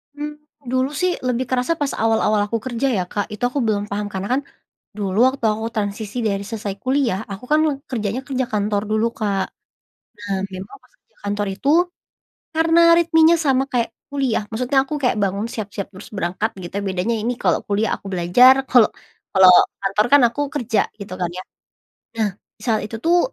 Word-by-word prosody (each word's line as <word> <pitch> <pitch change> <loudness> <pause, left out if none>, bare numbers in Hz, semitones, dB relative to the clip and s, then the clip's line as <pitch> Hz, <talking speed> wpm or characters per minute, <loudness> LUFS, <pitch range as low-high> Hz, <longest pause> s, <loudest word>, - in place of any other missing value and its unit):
Mmm, 295 0 -6 0.3
dulu 260 +1 +1
sih 360 -1 +1
lebih 250 +1 0
kerasa 255 +5 +1
pas 290 -4 -2
awal-awal 215 -2 +2
aku 230 +2 -2
kerja 260 +1 -1
ya 180 - +1
Kak 205 -1 -2
itu 210 - -8
aku 280 - -2
belum 205 -1 -1
paham 205 +1 -2
karena 190 +1 -3
kan, 275 - +1 0.6
dulu 200 -1 -2
waktu 265 -2 -4
aku 220 +1 -4
transisi 205 +2 -3
dari 200 -2 0
selesai 205 -3 -4
kuliah 255 -7 +1
aku 195 +4 -8
kan 305 +1 +4 0.3
kerjanya 225 -1 -2
kerja 260 -2 -1
kantor 205 -2 0
dulu 220 +1 +2
Kak. 200 -3 -1 0.8
Nah 200 -2 -3
memang 190 - -8
pas - - -26
kerja - - -42
kantor 205 0 -2
itu, 275 - -2 0.8
karena 330 +1 +4 0.2
ritmenya 330 0 +5
sama 265 -1 +3
kayak 240 -2 0 0.2
kuliah 265 -6 0
maksudnya 250 +5 -1
aku 300 - -6
kayak 250 -4 +1
bangun 200 +2 -1
siap-siap 200 -3 -5
terus 190 +2 -11
berangkat 195 +3 -2
gitu 175 - -8
ya - - -5
bedanya 190 +5 -1
ini 230 +3 -1
kalau 180 -4 +2
kuliah 205 +2 0
aku - - -32
belajar 245 +10 +6
kalau 245 -4 +6 0.5
kalau 190 -1 +8 0.3
kantor 200 +3 +1
kan 285 - +8
aku 290 +5 -4
kerja 240 -6 +1 0.2
gitu 195 -2 -7
kan 180 - -1
ya. 185 +1 -6 0.7
Nah 215 -2 +1 0.3
saat 225 -3 +1
itu 225 - -7
tuh 345 +2 +4
220 Hz, 180 wpm, -21 LUFS, 200-260 Hz, 0.8 s, kalau